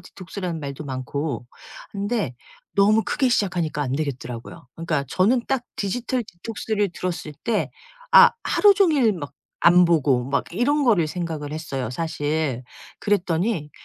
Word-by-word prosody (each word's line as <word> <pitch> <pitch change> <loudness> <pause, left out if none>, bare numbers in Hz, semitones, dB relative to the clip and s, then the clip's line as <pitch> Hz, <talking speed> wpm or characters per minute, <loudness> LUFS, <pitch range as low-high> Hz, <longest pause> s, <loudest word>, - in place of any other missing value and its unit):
디톡스라는 180 -1 -6
말도 140 +1 -6
많고 135 0 -4 0.4
근데 205 - -2 0.4
너무 210 +2 +4
크게 265 -3 +1
시작하니까 175 -9 0
안되겠더라고요. 130 -4 -4
그러니까 160 -4 -1
저는 225 - +2
딱 270 -2 0
디지털 245 +5 -1
디톡스를 205 +2 -3
들었을 175 -4 -4
때 225 -3 0 0.4
아 - - +10
하루 410 -1 +5
종일 305 - +4
막 145 -7 -7 0.3
안 175 +1 +7
보고 145 -7 +2
막 140 - +1
이런 280 - +1
거를 205 - +3
생각을 155 -3 -4
했어요 140 -6 -4
사실. 150 -2 -2 0.3
그랬더니 180 -4 0
170 Hz, 310 characters per minute, -23 LUFS, 145-210 Hz, 0.4 s, 아